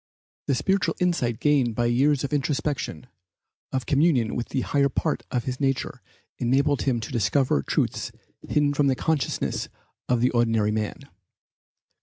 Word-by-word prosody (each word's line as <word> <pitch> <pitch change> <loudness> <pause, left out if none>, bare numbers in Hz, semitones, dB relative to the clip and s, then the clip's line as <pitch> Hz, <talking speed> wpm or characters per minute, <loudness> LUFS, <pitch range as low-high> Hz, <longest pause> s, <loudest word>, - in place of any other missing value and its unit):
The 140 - +2
spiritual 195 +8 +1
insight 165 - 0
gained 135 -6 +2
by 120 - +1
years 135 +4 +2
of 140 - -3
introspection, 145 -1 -2 0.7
of 130 -1 -2
communion 140 -6 +2
with 120 - -3
the 130 - -1
higher 140 +1 +2
part - - -1
of 125 -2 -1
his 130 +1 -4
nature 135 -3 -1 0.4
enabled 140 +3 +2
him 130 -4 +1
to 110 - -6
discover 120 - +2
truths - - -1 0.3
hidden 145 -1 +1
to 145 - 0
the 135 -2 +3
consciousness 155 -1 -1 0.4
of 125 -1 +3
the 125 +2 +2
ordinary 115 -3 +2
man. 110 +4 -3
130 Hz, 150 wpm, -25 LUFS, 120-145 Hz, 0.7 s, the